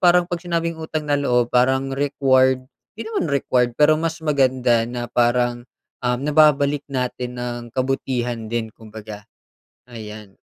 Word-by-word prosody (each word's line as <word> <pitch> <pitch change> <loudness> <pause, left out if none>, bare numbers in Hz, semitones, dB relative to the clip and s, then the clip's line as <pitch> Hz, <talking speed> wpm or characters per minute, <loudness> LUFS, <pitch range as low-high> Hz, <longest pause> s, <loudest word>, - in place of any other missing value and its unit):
parang 180 0 +5
pag 175 -1 -3
sinabing 170 -1 -2
utang 160 -1 -4
na 145 - +2
loob 125 -3 +2
parang 130 +2 +2
required 130 -2 +2 0.3
di 225 - -6
naman 220 -7 -2
required 125 -3 +1
pero 150 +1 +6
mas 165 0 -1
maganda 130 -5 +2
na 120 0 -4
parang, 120 0 +1 0.4
um, 125 0 +1
nababalik 145 -1 +3
natin 125 -1 -3
ng 120 0 -4
kabutihan 125 -3 -2
din 115 -1 -1
kumbaga, 110 -1 -10 0.6
ayan. 110 -3 -10
130 Hz, 135 wpm, -21 LUFS, 120-145 Hz, 0.6 s, pero